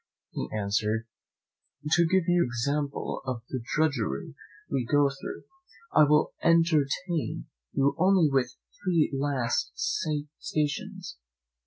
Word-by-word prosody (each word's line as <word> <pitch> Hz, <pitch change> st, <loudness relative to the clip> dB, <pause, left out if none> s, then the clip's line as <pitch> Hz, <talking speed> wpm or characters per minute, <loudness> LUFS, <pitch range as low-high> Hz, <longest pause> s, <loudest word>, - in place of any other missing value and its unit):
He -, -, -4 dB
answered, 105 Hz, +2 st, 0 dB, 0.9 s
"To 170 Hz, +1 st, +5 dB
give 190 Hz, +1 st, +3 dB
you 175 Hz, 0 st, +4 dB
an -, -, +2 dB
example 140 Hz, +4 st, -2 dB
of 125 Hz, -3 st, -4 dB
the 130 Hz, -, -3 dB
drudgery 120 Hz, -, -1 dB, 0.3 s
we 135 Hz, -2 st, -1 dB
go 145 Hz, +3 st, +3 dB
through, 135 Hz, -, -7 dB, 0.5 s
I 150 Hz, -, +7 dB
will 150 Hz, +1 st, +3 dB
entertain 165 Hz, 0 st, +2 dB, 0.3 s
you 140 Hz, +1 st, +2 dB
only 185 Hz, -2 st, +5 dB
with 135 Hz, -2 st, +2 dB
my -, -, -33 dB
three 170 Hz, -5 st, +2 dB
last 135 Hz, -, 0 dB, 0.7 s
stations. 175 Hz, -, -3 dB
145 Hz, 120 wpm, -28 LUFS, 125-165 Hz, 0.9 s, I